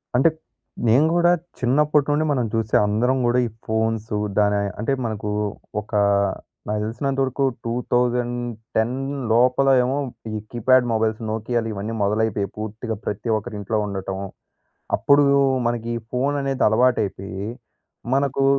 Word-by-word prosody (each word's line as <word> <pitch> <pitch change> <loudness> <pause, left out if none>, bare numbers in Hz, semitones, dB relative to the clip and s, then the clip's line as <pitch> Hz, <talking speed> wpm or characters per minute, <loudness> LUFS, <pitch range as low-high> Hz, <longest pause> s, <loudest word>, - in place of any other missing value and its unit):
అంటే 135 +6 +5 0.6
నేను 125 +7 +5
గూడా 175 0 +4 0.3
చిన్నప్పటి 145 +3 +2
నుండి 150 +2 +2
మనం 125 -4 +1
చూసే 110 -1 0
అందరం 120 +6 +1
గూడా 120 +1 +3
ఈ - - -7 0.2
ఫోన్స్ 110 0 -1 0.3
దాని, 105 -1 +3 0.2
అంటే 115 - -1
మనకు 105 -2 -3 0.5
ఒకా 105 0 -1 0.7
నాకు 105 0 -1
తెలిసినంతవరకు 135 +4 -1 0.2
2010 120 -1 -1 0.4
లోపల 125 +3 +4
ఏమో 130 +2 0 0.4
ఈ 110 - -3
కీప్యాడ్ 125 +1 +4
మొబైల్స్ 110 0 0
నోకియాలు 115 +1 -1
ఇవన్నీ 105 +3 -4
మొదలైపోయాయి. 105 0 0
పూర్తిగా 110 +1 -4
ప్రతి 105 +3 -3
ఒక్కరి 110 +1 -7
ఇంట్లో 105 +2 -1
ఉండటం. 95 -1 -4 0.8
అప్పుడు‌లో 140 -1 +4 0.3
మనకి 120 -1 -1
ఈ - - -1
ఫోను 135 +3 0
అనేది 135 -1 -1
అలవాటయిపోయి, 105 -5 0 0.7
మనకు 135 0 +1
115 Hz, 125 wpm, -22 LUFS, 110-130 Hz, 0.8 s, అంటే